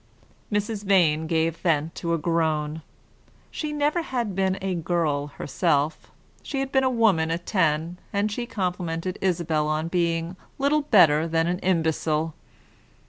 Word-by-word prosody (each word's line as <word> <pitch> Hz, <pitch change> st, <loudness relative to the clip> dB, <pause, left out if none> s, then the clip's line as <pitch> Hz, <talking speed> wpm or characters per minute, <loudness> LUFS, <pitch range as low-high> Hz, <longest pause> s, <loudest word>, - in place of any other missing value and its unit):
Mrs. 210 Hz, 0 st, -1 dB
Vane 165 Hz, -6 st, +3 dB
gave 165 Hz, 0 st, 0 dB
vent 160 Hz, -2 st, 0 dB
to 170 Hz, 0 st, -1 dB
a -, -, -1 dB
groan. 160 Hz, -1 st, 0 dB, 0.7 s
She 305 Hz, -1 st, -4 dB
never 295 Hz, +3 st, +1 dB
had 240 Hz, -9 st, -2 dB
been 190 Hz, 0 st, 0 dB
a 190 Hz, 0 st, -2 dB
girl 160 Hz, -4 st, 0 dB
herself 150 Hz, +1 st, -1 dB, 0.3 s
she 275 Hz, -, -4 dB
had 270 Hz, 0 st, -2 dB
been 265 Hz, -1 st, +3 dB
a 260 Hz, -, +3 dB
woman 215 Hz, -10 st, +2 dB
at 170 Hz, +1 st, -3 dB
ten; 165 Hz, -2 st, 0 dB
and 205 Hz, +1 st, 0 dB
she 240 Hz, +3 st, -3 dB
complimented 180 Hz, -4 st, -3 dB
Isabel 165 Hz, -5 st, 0 dB
upon 155 Hz, +2 st, -1 dB
being 170 Hz, 0 st, -1 dB, 0.2 s
little 285 Hz, +2 st, +2 dB
better 165 Hz, -, +5 dB
than 165 Hz, 0 st, +1 dB
an 175 Hz, +1 st, -1 dB
imbecile. 160 Hz, -3 st, 0 dB
170 Hz, 145 wpm, -25 LUFS, 160-200 Hz, 0.7 s, better